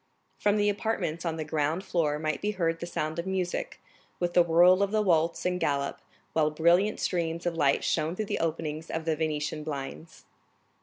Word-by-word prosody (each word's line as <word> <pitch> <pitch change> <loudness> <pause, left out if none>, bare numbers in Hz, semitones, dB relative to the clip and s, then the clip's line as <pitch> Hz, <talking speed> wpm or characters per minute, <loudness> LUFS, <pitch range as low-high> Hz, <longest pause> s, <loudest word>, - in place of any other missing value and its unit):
From 205 0 +2
the 205 0 +2
apartments 200 -6 -1
on 165 -1 -1
the 155 - -3
ground 155 +3 -1
floor 155 -6 0
might 155 -2 -2
be 210 +1 -1
heard 165 -2 0
the 170 - -5
sound 155 -1 -3
of 170 - -4
music, 185 -2 -2 0.4
with 175 -1 -1
the 175 - +6
whirl 175 +3 +5
of 200 - +2
the 215 +1 +1
waltz 170 -3 +1
and 180 0 0
galop, 140 -1 0 0.3
while 155 -1 +3
brilliant 170 +7 +3
streams 170 -1 -1
of 175 - 0
light 140 -4 +2
shone 160 +3 0
through 215 - -2
the - - -2
openings 160 -1 -3
of 160 0 -3
the 160 -1 +1
Venetian 150 -1 -2
blinds. 150 +2 -7
165 Hz, 195 wpm, -28 LUFS, 155-180 Hz, 0.4 s, the